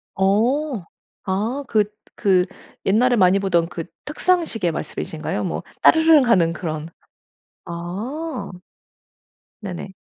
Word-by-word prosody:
어. 225 - +1 0.4
아. 215 +9 -1
그 215 -3 +3 0.4
그 185 -3 +4 0.4
옛날에 245 +6 +4
많이 190 -2 +4
보던 175 -4 +1
그 165 -3 -5 0.2
탁상시계 300 - 0
말씀이신가요? 160 - -4
뭐 - - -3 0.2
따르릉 320 -3 +6
하는 180 -8 +4
그런 160 -2 -4 0.8
아. 200 - -5 1.1
네네. 190 -1 -6
200 Hz, 195 characters per minute, -22 LUFS, 180-260 Hz, 1.1 s, 따르릉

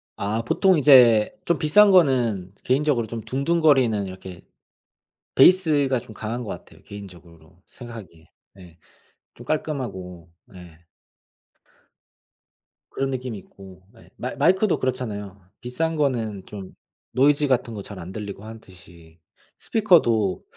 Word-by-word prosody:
아, 105 +3 -2
보통 185 +9 +2
이제 125 -7 +6
좀 170 - 0
비싼 200 +7 +5
거는 120 - +2
개인적으로 130 -2 +1
좀 115 +1 -6
둥둥거리는 135 -3 +1
이렇게 95 -1 -10 0.9
베이스가 145 -5 +4
좀 110 - -14
강한 115 +3 -5
것 110 - -8
같아요. - - -10
개인적으로 90 -4 -14
생각하기에. 110 -10 -12 0.3
네. 90 -4 -16 0.6
좀 - - -13
깔끔하고. 95 - -5
네. 90 -8 -15 2.1
그런 135 0 -2
느낌이 125 -4 -5
있고 95 -1 -16 0.2
예, - - -19
마 - - -6
마이크도 190 +2 +2
그렇잖아요. 105 -6 -4 0.2
비싼 160 +7 -3
거는 115 -10 -2
좀 100 -3 -10 0.4
노이즈 145 +2 +2
같은 120 -3 0
거 105 - -6
잘 100 -1 -10
안 90 +1 -9
들리고 100 -1 -8
하듯이 90 -6 -15 0.4
스피커도 120 - +2
115 Hz, 270 characters per minute, -23 LUFS, 95-140 Hz, 2.1 s, 이제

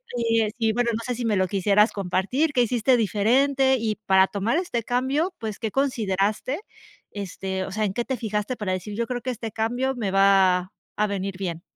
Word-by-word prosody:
eh, 230 -2 +1
sí, - - -30
y 225 -1 +2
bueno, 240 +1 +1
no 220 - -2
sé, 250 +1 -3
si 240 0 -4
me 220 -2 +1
lo 185 0 +2
quisieras 200 +3 +3
compartir, 200 - 0
¿qué 250 - +3
hiciste 245 +1 +2
diferente?, 265 +6 +2
y 220 -2 -1
para 190 -1 +5
tomar 210 - 0
este 345 -11 -3
cambio, 265 - 0
pues, 220 -2 -5
¿qué 220 -2 -3
consideraste?, 220 - 0 0.5
este, 190 -1 -4
o 190 - -6
sea, 215 +2 -1
en 195 - -2
qué 240 - -1
te 260 +1 -3
fijaste 215 +1 -3
para 195 -3 -2
decir: 185 +3 -5
"Yo 235 0 -1
creo 245 0 -3
que 255 - -4
este 230 -2 -5
cambio 245 +4 -1
me 215 -6 -2
va 190 -2 +4 0.2
a 210 - +2
venir 195 -1 -3
bien". 175 -4 -4
220 Hz, 210 wpm, -24 LUFS, 195-245 Hz, 0.5 s, para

